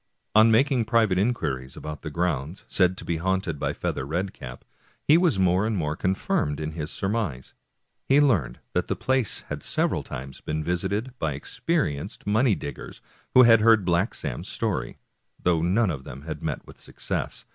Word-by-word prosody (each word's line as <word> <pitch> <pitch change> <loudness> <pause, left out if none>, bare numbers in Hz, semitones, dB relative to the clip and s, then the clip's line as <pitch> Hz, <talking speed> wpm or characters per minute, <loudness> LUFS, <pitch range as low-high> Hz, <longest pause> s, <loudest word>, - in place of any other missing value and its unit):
On 110 +1 +7
making 125 +1 +3
private 110 -5 +3
inquiries 75 - -1
about 75 -1 -6
the 80 - -5
grounds 85 0 -2
said 95 -1 +2
to - - -7
be 85 - -1
haunted 95 -2 -1
by - - 0
Feather - - -3
Red 85 +8 -2
cap, 60 0 -10 0.4
he 150 - +5
was 170 - +3
more 95 +2 +3
and 110 -2 -1
more 75 -3 -1
confirmed 85 -5 0
in 75 0 -3
his 80 -1 -4
surmise. 95 - -3 0.5
He 135 +2 +5
learned 95 - +2 0.2
that - - 0
the - - -1
place 130 -5 0
had - - -6
several - - 0
times 65 0 -8
been 75 0 -3
visited 100 +9 -2
by 80 -3 0
experienced 100 - -2
money 110 +2 +3
dig 70 - -6
gers - - -10 0.4
who 130 - +10
had 115 -2 +7
heard 110 -3 +5
Black 90 +4 +1
Sam's - - -5
story, - - -2 0.4
though 85 -3 +2
none 95 +4 +2
of 70 -4 -6
them 70 +2 -9
had 80 0 -6
met - - -3
with - - -15
success. - - -4
90 Hz, 180 wpm, -25 LUFS, 75-110 Hz, 0.5 s, who